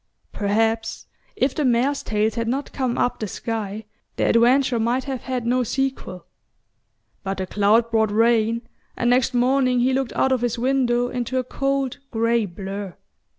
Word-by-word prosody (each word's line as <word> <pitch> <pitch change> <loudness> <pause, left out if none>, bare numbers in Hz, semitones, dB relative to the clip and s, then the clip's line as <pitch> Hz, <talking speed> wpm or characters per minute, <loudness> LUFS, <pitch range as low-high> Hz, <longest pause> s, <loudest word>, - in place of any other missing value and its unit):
Perhaps 225 +2 0 0.3
if 260 0 +1
the 305 - -1
mares' 255 +3 +2
tails 215 0 0
had 230 -1 -2
not 270 +4 -2
come 255 -3 -1
up 245 - 0
the 215 - -3
sky 215 0 -4 0.3
their - - +1
adventure 245 +1 +3
might 240 +3 0
have 265 -3 -4
had 255 -3 -3
no 250 +2 +2
sequel. 260 -7 -3 1.0
But 195 -1 -4
the 190 - -2
cloud 210 +4 +2
brought 220 -1 +2
rain, 230 +1 +2 0.3
and 240 0 +2
next 250 0 +2
morning 255 0 +2
he 260 +2 +2
looked 265 -2 -1
out 265 - +1
of 255 -2 +1
his 240 -1 -1
window 245 -1 +1
into 245 0 -3
a 255 - +1
cold 275 +1 -2
grey 230 -1 +1
blur. 195 0 -7
240 Hz, 165 wpm, -22 LUFS, 220-255 Hz, 1.0 s, adventure